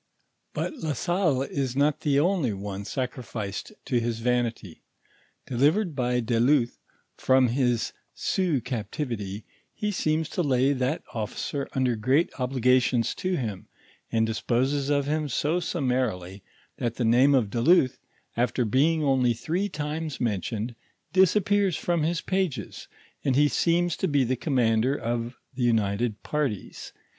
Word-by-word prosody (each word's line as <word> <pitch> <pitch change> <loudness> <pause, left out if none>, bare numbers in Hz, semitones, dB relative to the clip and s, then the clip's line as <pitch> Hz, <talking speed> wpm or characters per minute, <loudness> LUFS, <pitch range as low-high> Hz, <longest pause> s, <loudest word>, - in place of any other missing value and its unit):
But 310 - -3
La 160 - -2
Salle 170 -6 +1
is 135 -2 -3
not 145 +2 +2
the 145 -3 +2
only 165 - +1
one 100 0 -5
sacrificed 120 -4 -4
to 120 - +1
his 115 -1 -2
vanity. 115 -6 -1 0.6
Delivered 150 - +1
by 125 -1 +1
de 115 0 0
Luth 125 -1 +2 0.4
from 130 -1 +4
his 125 -2 0 0.2
Sioux 175 -9 0
captivity, 110 -4 -4 0.3
he 210 0 -1
seems 155 -4 0
to - - -1
lay 135 -2 +2
that 130 +4 -1
officer 115 +5 -3
under 130 -2 +1
great 130 +9 +2
obliga 125 0 +3
tions 125 -2 0
to 185 -1 -2
him, 105 -7 -4 0.4
and 115 0 +2
disposes 130 +5 0
of 140 -1 +2
him 150 0 -1
so 150 +7 0
summarily, 125 - -2 0.4
that 120 -1 -2
the 120 - -1
name 130 +5 +5
of 110 -6 +1
de 115 - -1
Luth, 145 -2 +4 0.4
after 120 +1 +1
being 150 +8 +2
only 130 -4 +3
three 175 - -2
times 155 -2 -4
mentioned, 110 +1 -2 0.4
disappears 190 0 +3
from 170 -2 0
his 165 +2 0
pages, 180 - -2 0.4
and 135 -3 +1
he 145 +2 +5
seems 170 +2 +1
to 190 - 0
be 145 -4 +2
the 130 +1 0
commander 125 -2 +1
of 120 -1 -3 0.2
tl\i 130 - -4
united 110 -1 +1
parties. 140 -9 -3
130 Hz, 145 wpm, -26 LUFS, 115-150 Hz, 0.6 s, name